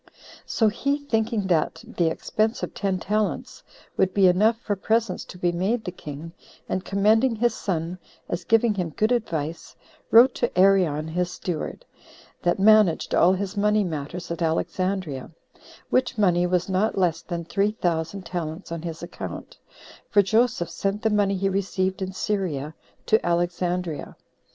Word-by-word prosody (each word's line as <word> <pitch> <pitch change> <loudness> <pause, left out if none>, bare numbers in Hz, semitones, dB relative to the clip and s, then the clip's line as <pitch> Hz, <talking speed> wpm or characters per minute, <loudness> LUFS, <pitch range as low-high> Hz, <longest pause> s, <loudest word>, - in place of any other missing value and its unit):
So 225 - +2
he 275 +7 0
thinking 225 -6 -1
that 160 -2 0
the 170 - 0
expense 215 +7 -1
of - - -4
ten 195 -2 -1
talents 210 +3 -2 0.4
would 190 -1 +1
be 200 -2 +5
enough 210 +5 +4
for 205 -3 -2
presents 220 0 0
to - - -11
be 175 -1 +1
made 200 +7 -1
the 180 - -3
king, 155 -1 -8 0.4
and 185 - -2
commending 220 +6 +3
his 235 +1 +1
son, 175 -3 -3 0.3
as 175 - -3
giving 225 +4 +3
him 180 -4 -2
good 215 +2 +2
advice, 165 -9 -2 0.3
wrote 245 +3 +7
to 240 - 0
Arion 180 -6 +4
his 175 +2 -1
steward, 175 -3 -5 0.6
that 175 - +1
managed 210 -4 +4
all 180 +2 +5
his 195 +1 -3
money 210 +1 +2
matters 170 +1 -5
at 170 - -4
Alexandria; 165 -2 -1 0.6
which 255 -2 +1
money 180 -4 +3
was 180 -1 0
not 195 +3 0
less 170 -3 +1
than 170 -2 -5
three 200 +4 0
thousand 175 -1 -2
talents 170 0 -5
on 170 -1 -4
his 165 0 -6
account, 170 - -8 0.5
for 205 -1 +5
Joseph 220 -3 +1
sent 200 +1 -2
the 220 - +2
money 200 -2 +2
he 195 +1 0
received 190 -1 -1
in 190 0 -2
Syria 185 -8 -2 0.3
to 220 - +3
Alexandria. 175 -1 -1
190 Hz, 155 wpm, -24 LUFS, 170-210 Hz, 0.6 s, wrote